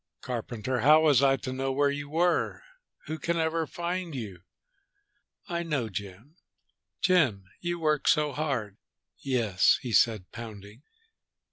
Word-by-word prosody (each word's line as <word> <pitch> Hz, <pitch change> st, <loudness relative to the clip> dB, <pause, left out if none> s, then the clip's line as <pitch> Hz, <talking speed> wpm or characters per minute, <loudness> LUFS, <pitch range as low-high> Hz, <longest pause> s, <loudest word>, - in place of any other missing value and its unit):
"Carpenter, 125 Hz, 0 st, -3 dB
how 150 Hz, +6 st, +6 dB
was 145 Hz, -5 st, +5 dB
I 135 Hz, -1 st, +4 dB
to 130 Hz, -, -5 dB
know 135 Hz, +1 st, -2 dB
where 140 Hz, +1 st, +2 dB
you 145 Hz, 0 st, -5 dB
were? 175 Hz, -, +1 dB, 0.4 s
Who 160 Hz, +1 st, -5 dB
can 170 Hz, 0 st, -1 dB
ever 160 Hz, 0 st, 0 dB
find 175 Hz, -1 st, -4 dB
you?" 100 Hz, -8 st, -6 dB, 1.1 s
"I 170 Hz, -1 st, -2 dB
know 150 Hz, -9 st, -2 dB
Jim. 100 Hz, -, -8 dB, 0.6 s
Jim, 135 Hz, -, +3 dB
you 175 Hz, 0 st, -2 dB
work 155 Hz, -3 st, 0 dB
so 150 Hz, -2 st, +3 dB
hard!" 130 Hz, -9 st, -2 dB, 0.4 s
"Yes!" 115 Hz, -8 st, +2 dB
he 120 Hz, -3 st, -4 dB
said, 105 Hz, -2 st, +2 dB
pounding. 110 Hz, -1 st, -10 dB
135 Hz, 135 wpm, -28 LUFS, 110-160 Hz, 1.1 s, how